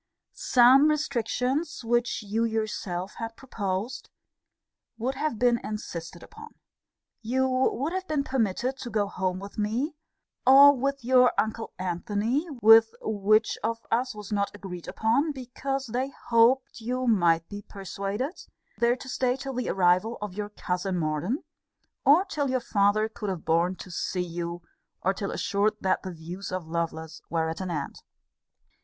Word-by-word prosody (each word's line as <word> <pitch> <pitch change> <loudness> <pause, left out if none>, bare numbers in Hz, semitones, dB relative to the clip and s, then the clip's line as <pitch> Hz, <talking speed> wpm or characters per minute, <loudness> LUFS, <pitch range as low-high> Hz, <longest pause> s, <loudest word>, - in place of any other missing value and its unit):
Some 255 +4 +6
restrictions 285 0 -1
which 240 0 0
you 215 +3 -1
yourself 210 -5 -2
had 225 0 -5
proposed, 220 -1 -4 0.9
would 245 +4 -1
have 300 -3 -2
been 240 0 +3
insisted 175 -5 -6
upon. 445 +1 -13 0.7
You 260 +4 +1
would 260 +4 0
have 375 0 -3
been 300 -2 0
permitted 255 0 -1
to 245 - -6
go 210 -2 +1
home 185 -2 -2
with 200 +3 -8
me, 235 +9 -1 0.5
or 280 +2 +8
with 275 0 -2
your 250 0 +5
uncle 220 +1 -1
Antony, 205 - -1 0.2
(with 225 +1 +7
which 215 +1 +2
of 230 +1 -2
us 245 0 0
was 210 -1 -9
not 200 -1 +1
agreed 185 -4 -8
upon, 275 +8 +1
because 270 +1 -4
they 250 +3 -2 0.2
hoped 245 +3 +3
you 250 +3 -2
might 170 -8 +3
be 205 0 -7
persuaded,) 200 - -5 0.4
there 235 +1 +3
to 255 - -11
stay 250 -1 0
till 270 0 -6
the 250 0 -2
arrival 185 +5 +2
of 210 -3 -5
your 205 +1 -4
cousin 185 -2 -2
Morden; 160 - -1 0.6
or 315 +7 +6
till 295 -8 -2
your 255 0 +1
father 210 -1 +2
could 215 -2 -6
have 185 -4 -4
borne 170 +3 +2
to 185 - -10
see 180 +1 -2
you; 170 0 -5 0.4
or 190 - +2
till 200 0 -4
assured 205 +2 0
that 190 - +1
the 190 - -6
views 175 +4 -7
of 185 -2 -3
Lovelace 160 -1 -4
were 160 -1 0
at 165 - -5
an 185 - -3
end. 150 -5 -4
220 Hz, 155 wpm, -27 LUFS, 190-255 Hz, 0.9 s, or